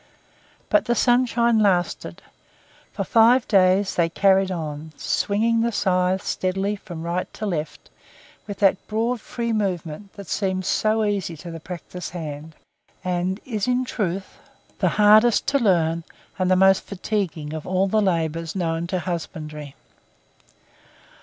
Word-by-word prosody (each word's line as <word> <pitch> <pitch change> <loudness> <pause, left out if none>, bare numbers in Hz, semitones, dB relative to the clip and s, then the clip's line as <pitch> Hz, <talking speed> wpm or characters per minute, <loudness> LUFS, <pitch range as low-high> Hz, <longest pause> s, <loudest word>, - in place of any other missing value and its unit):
But 310 -1 +3
the 240 - +1
sunshine 240 -2 +3
lasted. 185 -4 0 0.7
For - - -3
five 235 +2 +4
days 190 0 +3
they 170 -1 +1
carried 195 +2 +3
on, 155 -3 -5
swinging 225 +3 +1
the 235 +1 +1
scythe 185 -2 +1
steadily 195 +2 -1
from 175 -5 -9
right 175 +2 -3
to 215 - -4
left 160 -6 -4 0.6
with 205 -2 -6
that 195 -1 +3
broad 225 +2 -1
free 235 -1 -3
movement 190 -2 -3
that 200 - -10
seems 190 -2 -1
so 215 +2 +1
easy 195 -5 -2
to 170 +2 -9
the 165 - -7
practised 180 +1 -8
hand, 155 -2 -7 0.5
and 180 +2 -1
is 220 -5 -2
in 250 0 +1
truth 195 -5 -4 0.4
the - - +3
hardest 215 +2 +5
to 280 0 +2
learn 170 -7 +2 0.4
and 185 0 +1
the 185 - +5
most 190 +1 +5
fatiguing 180 -7 -3
of 155 -1 -6
all 185 +1 +2
the 215 +2 +2
labours 165 -3 -1
known 165 -2 -1
to 185 - -1
husbandry. 155 -5 -6
190 Hz, 140 wpm, -23 LUFS, 170-215 Hz, 0.7 s, hardest